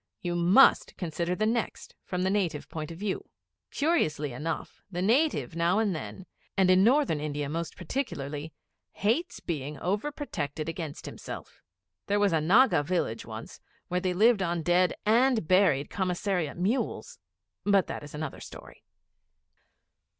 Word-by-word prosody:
You 175 -1 -1
must 175 +10 +5
consider 175 0 -2
the 215 - 0
next 230 0 -2
from 180 0 -2
the 190 - +1
native 180 -7 -1
point 155 -2 -5
of 165 - -8
view. 200 0 -3 0.4
Curiously 155 - 0
enough, 155 +6 -5
the 180 0 -2
native 250 - +2
now 170 +3 +2
and 210 -5 +1
then, 180 +4 -7 0.3
and 190 -1 +5
in 185 +1 +5
Northern 255 - +3
India 145 -1 -3
more 165 +3 -2
particularly, 155 - -4 0.4
hates 235 - 0
being 150 -3 -4
over 205 +11 -1
protected 155 - -4
against 165 -3 -5
himself. - - -9 0.5
There 205 +1 +2
was 205 -3 +3
a 160 - +2
Naga 205 - +5
Village 145 -9 -2
once, 110 0 -8 0.3
where 180 - +1
they 180 -1 -1
lived 220 +2 +5
on 170 -2 -1
dead 180 +1 +3
and 230 -3 +3
buried 180 -7 +3
Commissariat 180 -4 -1
mules.... 245 - -2 0.4
But 200 -2 +4
that - - -5
is 145 0 -10
another 150 -2 -5
story. - - -12
180 Hz, 150 wpm, -28 LUFS, 155-210 Hz, 0.5 s, must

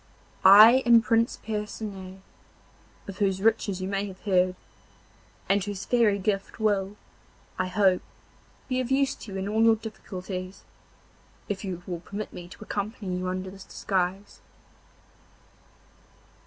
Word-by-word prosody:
I 215 +7 +9
am 235 -2 +6
Prince 230 0 +1
Percinet, 210 -3 -5 0.9
of 195 -1 -8
whose 195 -2 +1
riches 200 -3 +1
you - - -2
may 200 +1 -2
have 190 -1 -11
heard, 185 -2 +2 0.9
and 200 0 +2
whose 200 -1 -5
fairy 230 -5 +3
gift 195 +1 -2
will, 205 -2 0 0.6
I 185 - 0
hope, 185 -1 +2 0.7
be 255 -1 -1
of 255 - -4
use 270 0 +2
to 205 - -10
you - - -4
in 190 +1 -3
all 215 +2 0
your 225 0 +6
difficulties, 190 -4 -7 0.8
if 205 -2 -4
you 180 -3 -5
will 175 -2 -4
permit 200 +5 -7
me 175 - -9
to 185 - -12
accompany 205 -2 -4
you 180 0 -3
under 185 +1 -4
this 195 0 -11
disguise. 190 +1 -3
200 Hz, 140 wpm, -26 LUFS, 185-215 Hz, 0.9 s, I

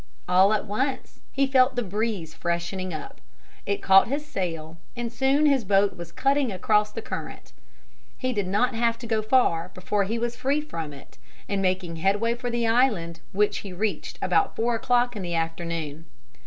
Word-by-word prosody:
All 190 +3 +5
at 215 - +1
once 255 +6 -3
he 275 0 +2
felt 260 -1 +4
the 245 - 0
breeze 205 -5 -2
freshening 175 +2 -3
up. 155 - -7 0.5
It 405 - -1
caught 195 0 +7
his 285 +4 -2
sail 165 - -4 0.2
and 240 -1 -4
soon 275 +3 +3
his 275 -4 +3
boat 200 0 +3
was 170 -1 -9
cutting 275 +3 +1
across 210 +3 +2
the - - -6
current. - - -7 0.6
He 255 -1 -1
did 205 -4 -1
not 225 +7 +1
have 230 0 +1
to 235 - -9
go 220 -1 0
far 215 -7 +2
before 195 +2 0
he 225 +4 -2
was 235 +1 -2
free 270 +4 0
from 165 - -5
it 140 -3 -14 0.3
and 200 -1 -1
making 185 -3 -1
headway 200 +7 +1
for 245 +1 -4
the 235 0 0
island, 220 -9 +2
which 205 +2 +1
he 200 - -8
reached 205 +3 -3
about 405 - +2
four 235 +2 +1
o'clock 245 +1 +1
in 205 - -4
the 175 -2 -3
afternoon. 165 -2 -3
210 Hz, 180 wpm, -25 LUFS, 180-245 Hz, 0.6 s, caught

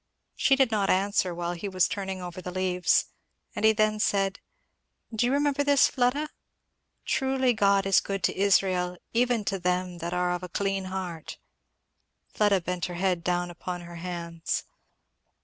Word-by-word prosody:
She 270 - +4
did 270 -3 +3
not 205 -3 +1
answer 195 -1 +2
while 175 0 -2
he 185 +4 -5
was 185 -2 +2
turning 190 -2 -4
over 180 +1 -7
the 180 - -6
leaves, 180 -1 +1 0.5
and - - -4
he 220 - +7
then 215 0 +1
said, 195 -2 +1 0.7
"Do 225 +2 +1
you - - +1
remember 285 0 +1
this, 285 -1 +5
Fleda? 275 +4 0 0.8
'Truly 265 -1 +1
God 200 -2 +3
is 195 -1 +5
good 195 -1 -4
to - - +1
Israel, 185 -2 +2 0.2
even 240 -2 +1
to 195 0 -1
them 180 0 -1
that 170 +1 -4
are 180 0 0
of 175 - -3
a 180 - -7
clean 195 +1 -1
heart.'" 185 -4 -5 1.0
Fleda 205 -3 +3
bent 180 0 -3
her 175 - -6
head 180 -1 0
down 175 0 -1
upon 175 +1 -6
her 170 0 -10
hands. 170 -1 -4
190 Hz, 165 wpm, -27 LUFS, 180-215 Hz, 1.0 s, he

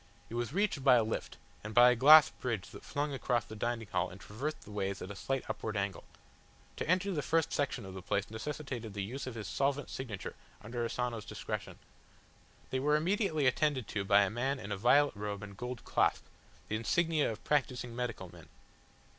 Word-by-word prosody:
It - - -6
was 120 0 -2
reached 190 -5 0
by 130 -2 +7
a 115 - +4
lift, 110 - -4 0.3
and 105 +1 -7
by 120 +1 +8
a - - +2
glass 150 +5 +9
bridge 115 -7 -4
that - - -10
flung 145 0 -2
across 120 -4 0
the 110 - -9
dining 115 +1 -2
hall - - 0
and - - -11
traversed 140 +9 -5
the 105 - -12
ways 100 -2 -2
at 95 - -6
a - - -7
slight 135 +6 -2
upward 110 0 -3
angle. 100 -1 -2 0.7
To - - -3
enter 185 +3 +2
the 155 -5 -1
first 165 +1 +1
section 140 -8 -1
of 95 - -8
the 95 - -7
place 100 +3 -1
necessitated 120 -3 -5
the 100 - -2
use 130 +7 -5
of 125 - -5
his 110 -4 -5
solvent 140 +1 0
signature 115 -7 -5 0.3
under 120 +2 -3
Asano's 115 -1 -2
direction. - - -5 0.9
They 130 - 0
were 150 +3 +3
immediately 165 -2 +1
attended 130 -2 +2
to 100 - -1
by 100 +1 +5
a 100 - -1
man 130 +4 -1
in 105 -3 -7
a - - 0
violet 130 +8 +4
robe 100 0 -4
and 100 -1 -9
gold 125 +4 -6
clasp, - - +2 0.4
the 110 - -1
insignia 155 +5 +1
of 110 - -8
practising 125 -5 0
medical 120 -6 -3
men. 85 -3 -14
120 Hz, 205 wpm, -33 LUFS, 105-145 Hz, 0.9 s, glass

